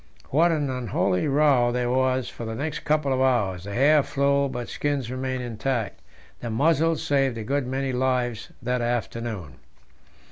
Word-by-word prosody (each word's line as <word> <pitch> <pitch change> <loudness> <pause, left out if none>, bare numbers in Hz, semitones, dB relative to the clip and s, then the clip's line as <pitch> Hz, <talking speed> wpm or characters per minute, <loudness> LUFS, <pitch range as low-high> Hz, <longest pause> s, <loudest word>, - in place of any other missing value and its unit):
What 165 +5 +4
an 150 -3 0
unholy 120 -3 0
row 140 -4 +3
there 120 0 0
was 130 -1 +1
for - - -8
the 110 0 -4
next 145 +5 -3
couple 150 -2 +1
of 130 - 0
hours! 100 -9 +1
The 100 - -6
hair 145 +4 +5
flew, 140 0 +1
but 120 -2 -5
skins 140 -4 -2
remained 130 0 -3
intact. 120 -1 -2 0.4
The 120 - -5
muzzles 160 +6 +2
saved 135 -4 +1
a 110 - -4
good 140 +2 -1
many 135 0 -2
lives 125 -3 -1
that 125 0 0
afternoon. 115 - -3
130 Hz, 165 wpm, -25 LUFS, 120-140 Hz, 0.4 s, hair